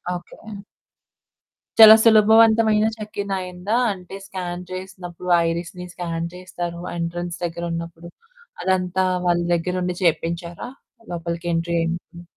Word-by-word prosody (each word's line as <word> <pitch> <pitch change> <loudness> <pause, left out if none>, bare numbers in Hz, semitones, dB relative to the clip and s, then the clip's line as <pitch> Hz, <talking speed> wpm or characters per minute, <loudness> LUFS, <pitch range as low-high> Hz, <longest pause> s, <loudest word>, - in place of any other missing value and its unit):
Okay. 175 - -10 1.4
చాలా 220 -1 +12
సులభవంతమైన 220 0 +5
check-in 210 -2 -5
అయిందా? 185 +3 -3 0.2
అంటే 180 0 -11
స్కాన్ 180 -2 -5
చేసినప్పుడు, 185 -1 -7 0.2
ఐరిస్‌ని 175 +1 -5
స్కాన్ 170 -1 -4
చేస్తారు, 175 -1 -6 0.2
ఎంట్రన్స్ 170 +1 -4
దగ్గరున్నప్పుడు, 170 0 -5 0.5
అదంతా 185 0 +1 0.2
వాళ్ళ 175 0 +3
దగ్గరుండి 180 +1 -1
చేయిపించారా? 170 +3 -1 0.4
లోపలికి 170 0 -4
ఎంట్రీ 170 +1 -1
అయింది. 170 +1 -5
180 Hz, 95 wpm, -22 LUFS, 170-190 Hz, 1.4 s, చాలా